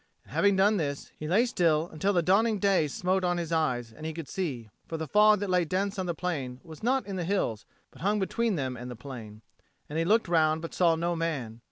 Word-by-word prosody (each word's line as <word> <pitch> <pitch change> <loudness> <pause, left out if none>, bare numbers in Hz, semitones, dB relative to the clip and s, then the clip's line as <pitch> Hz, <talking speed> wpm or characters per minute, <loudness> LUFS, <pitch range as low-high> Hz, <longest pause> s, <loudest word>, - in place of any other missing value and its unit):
And - - -16
having 200 -1 +3
done 205 +2 +4
this, 145 -5 -3
he 155 - -6
lay 205 +9 +4
still 165 -8 +2
until 190 +6 +1
the 175 -4 +2
dawning 215 +5 +3
day 195 -5 +2
smote 185 +6 0
on 175 -1 +1
his 170 -1 -3
eyes 125 -8 0
and 155 - -12
he 160 0 -4
could 165 -4 -6
see; 130 - -4 0.2
for 165 - -4
the 160 - -3
fog 210 +2 +5
that 205 - -2
lay 180 -1 +3
dense 195 +4 -1
on 185 - -2
the 170 - -2
plain 140 -8 -3
was 160 -2 -12
not 255 0 +1
in 195 -1 -5
the 180 - -2
hills, 165 - -1 0.2
but - - -16
hung 205 +4 +2
between 220 +2 0
them 130 -4 -2
and 125 +1 -7
the 125 - -6
plain. 110 -4 -9 0.4
And 155 +2 -3
he 165 - +1
looked 220 +4 +3
round, 160 -1 +2
but 165 - -6
saw 170 -3 +3
no 170 +1 -1
man. 140 -9 -3
170 Hz, 245 wpm, -28 LUFS, 150-195 Hz, 0.4 s, fog